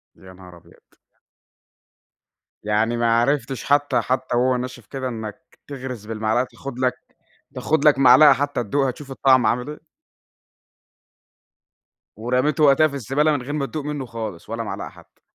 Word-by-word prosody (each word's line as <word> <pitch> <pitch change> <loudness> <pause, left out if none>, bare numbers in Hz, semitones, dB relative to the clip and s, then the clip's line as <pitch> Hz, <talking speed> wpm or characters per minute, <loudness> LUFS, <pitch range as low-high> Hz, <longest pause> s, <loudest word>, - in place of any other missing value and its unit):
يا 95 0 -15
نهار 90 -1 -14
أبيض! 85 0 -21 1.8
يعني 110 +3 0
ما 115 0 +2
عرفتش 135 +1 -1
حتى 145 0 +2
حتى 130 -1 -2
وهو 130 +1 +2
ناشف 125 -2 -7
كده 135 -2 -5
إنك 110 -4 -8
تغرس 130 -6 -7
بالمعلقة 110 +1 -1
وتاخد 130 0 -8
لك 130 -1 +1 0.6
تاخد 155 -1 0
لك 150 -2 +6
معلقة 140 +3 +7
حتى 140 -1 -2
تدوقها، 135 +4 0
تشوف 140 +2 -12
الطعم 130 -3 +3
عامل 125 +5 0
إيه؟ 150 - -8 2.4
ورميته 125 +6 0
وقتها 145 +2 +5
في 145 - -10
الزبالة، 140 +4 0
من 145 - -1
غير 135 +4 -6
ما 150 -2 -1
تدوق 150 +1 -6
منه 145 -3 -4
خالص 110 -7 -7
ولا 115 +1 -3
معلقة 110 - -6
حتى؟ - - -20
130 Hz, 150 wpm, -22 LUFS, 115-140 Hz, 2.4 s, معلقة